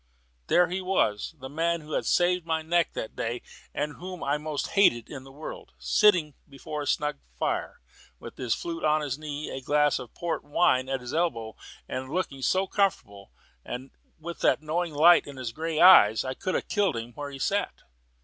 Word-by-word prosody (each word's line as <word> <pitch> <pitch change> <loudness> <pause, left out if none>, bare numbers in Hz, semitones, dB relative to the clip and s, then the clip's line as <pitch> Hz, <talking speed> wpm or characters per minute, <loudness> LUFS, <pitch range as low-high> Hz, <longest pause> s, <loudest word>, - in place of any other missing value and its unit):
There 175 0 +4
he 185 +2 -3
was, 160 - 0
the 130 - -7
man 165 +4 -1
who 155 0 -12
had - - -1
saved 180 0 +2
my 160 -1 -1
neck 170 +1 +1
that 110 - -5
day, 120 +1 -3 0.3
and 150 0 -3
whom 180 0 -8 0.2
most 150 -2 -3
I - - -12
hated 120 - +3
in 135 -3 -7
the 135 - -13
world, 150 +3 -9
sitting 180 -8 +3 0.2
before 145 +2 -6
a 145 - -5
snug 150 0 0 0.2
fire, - - -2 0.4
with - - -10
his 125 -3 0
flute 165 -1 -5
on 155 0 +3
his 145 -1 -3
knee, 150 -1 -5
a 135 - -5
glass 145 +2 +2
of 125 -3 -10
port 170 -1 -3
wine 130 -3 +2
at 135 -1 -2
his 125 +1 -7
elbow, 115 -10 -1 0.3
and 130 0 -5
looking 145 -5 -3
so 185 +8 +2
comfortable, 100 - -1 0.9
with 170 +2 -7
that - - +2
knowing 160 +1 -2
light 170 +4 +6
in 140 -2 -9
his 125 -3 -4
grey 160 +4 -3
eyes, 110 - +8
that 130 - -4
I - - -2
could 185 +7 -3
have - - -2
killed 200 - +1
him 115 +1 -6
where 145 +3 -6
he 140 - -8
sat. 200 +9 -2
150 Hz, 195 wpm, -27 LUFS, 130-170 Hz, 0.9 s, eyes